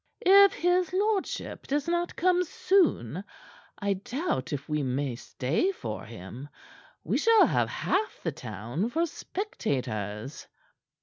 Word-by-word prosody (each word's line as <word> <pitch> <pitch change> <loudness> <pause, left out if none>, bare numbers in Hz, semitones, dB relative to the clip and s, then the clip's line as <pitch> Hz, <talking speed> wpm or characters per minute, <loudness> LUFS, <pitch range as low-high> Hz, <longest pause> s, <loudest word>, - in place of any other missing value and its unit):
"If 395 +1 +8
his 355 0 +1
lordship 405 +1 -1
does 290 +2 0
not 345 0 -1
come 360 +1 +3
soon, 360 - +1 0.5
I 200 -1 0
doubt 245 - -3
if 145 -2 -4
we 150 -1 0
may 130 -1 -1
stay 135 - -1
for 110 - -6
him. 115 +6 -9 0.5
We - - 0
shall 455 -1 +6
have - - +1
half 420 +3 -1
the 165 - 0
town 120 - -4
for 330 +6 +1
spectators." 130 - -4
235 Hz, 125 wpm, -28 LUFS, -, 0.5 s, If